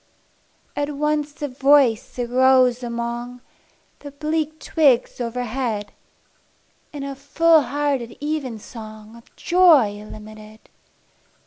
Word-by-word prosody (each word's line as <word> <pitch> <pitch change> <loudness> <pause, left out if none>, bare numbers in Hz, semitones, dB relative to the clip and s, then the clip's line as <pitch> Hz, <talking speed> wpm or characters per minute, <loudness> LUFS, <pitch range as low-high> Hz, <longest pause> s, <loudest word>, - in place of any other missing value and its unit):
At 290 0 -2
once 300 0 -2
a - - 0
voice 265 -4 +2
arose 250 0 +3
among 240 +1 -5 0.6
The 290 - -9
bleak 310 +2 -3
twigs 270 -7 +2
overhead, 235 -3 -3 1.0
In 290 -2 -7
a 275 0 -5
full 310 +4 +3
hearted 275 -3 -2
evensong 225 -7 -6
Of 235 - -19
joy 300 - +4
illimited. 215 0 -12
255 Hz, 95 wpm, -21 LUFS, 235-290 Hz, 1.0 s, joy